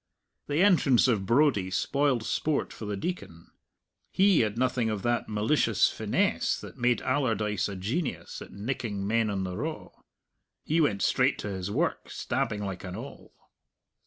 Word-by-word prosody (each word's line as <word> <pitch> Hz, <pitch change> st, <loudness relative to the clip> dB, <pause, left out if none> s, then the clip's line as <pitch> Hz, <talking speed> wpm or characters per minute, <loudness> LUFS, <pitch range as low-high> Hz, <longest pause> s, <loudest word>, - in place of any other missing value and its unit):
The 150 Hz, +5 st, +2 dB
entrance 155 Hz, -, +4 dB
of 105 Hz, -6 st, +1 dB
Brodie 120 Hz, -7 st, +3 dB
spoiled 135 Hz, +5 st, +1 dB
sport 150 Hz, +5 st, -1 dB
for 110 Hz, -, -8 dB
the 105 Hz, -1 st, -3 dB
Deacon. 95 Hz, -, -6 dB, 0.6 s
He 195 Hz, -2 st, +4 dB
had 110 Hz, -1 st, 0 dB
nothing 125 Hz, -2 st, +1 dB
of 105 Hz, -3 st, -3 dB
that 120 Hz, -1 st, 0 dB
malicious 110 Hz, +8 st, +2 dB
finesse -, -, 0 dB
that -, -, -10 dB
made 120 Hz, 0 st, +1 dB
Allardyce 110 Hz, -7 st, 0 dB
a 100 Hz, -, -5 dB
genius 120 Hz, -, -3 dB
at -, -, -10 dB
nicking 105 Hz, -2 st, -4 dB
men 115 Hz, +1 st, +1 dB
on 95 Hz, -2 st, -2 dB
the 90 Hz, -1 st, -4 dB
raw. -, -, -4 dB, 0.8 s
He 160 Hz, +2 st, +2 dB
went 105 Hz, -10 st, +1 dB
straight -, -, +2 dB
to 105 Hz, -, -4 dB
his 95 Hz, -1 st, -4 dB
work, 155 Hz, +11 st, -1 dB
stabbing 120 Hz, -5 st, -2 dB
like 95 Hz, -2 st, -5 dB
an 90 Hz, -1 st, -6 dB
awl. 120 Hz, +7 st, -9 dB
115 Hz, 160 wpm, -28 LUFS, 100-140 Hz, 0.8 s, entrance